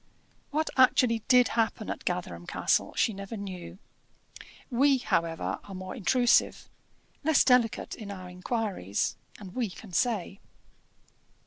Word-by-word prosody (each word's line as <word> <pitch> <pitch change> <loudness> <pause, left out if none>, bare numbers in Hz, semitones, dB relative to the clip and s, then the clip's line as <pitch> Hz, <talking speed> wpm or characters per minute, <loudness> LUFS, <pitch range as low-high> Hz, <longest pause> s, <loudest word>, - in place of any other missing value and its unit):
What 310 +2 -1
actually 250 -2 +5
did 250 -1 +5
happen 225 -2 -1
at - - -7
Gatherum 90 - -3
Castle, - - 0
she 225 - +2
never 200 +3 -7
knew. 185 -3 -7 0.9
We, 270 +3 +4
however, 165 -9 -1
are 195 - -9
more 185 +3 -6
intrusive, 245 +2 +2 0.6
less 310 -1 +4
delicate 250 -4 +2
in 210 -2 -8
our 185 -2 -7
inquiries, 180 - -2 0.2
and 190 -3 -10
we 245 -4 -1
can 185 +2 -12
say. 200 -2 0
215 Hz, 125 wpm, -28 LUFS, 185-250 Hz, 0.9 s, actually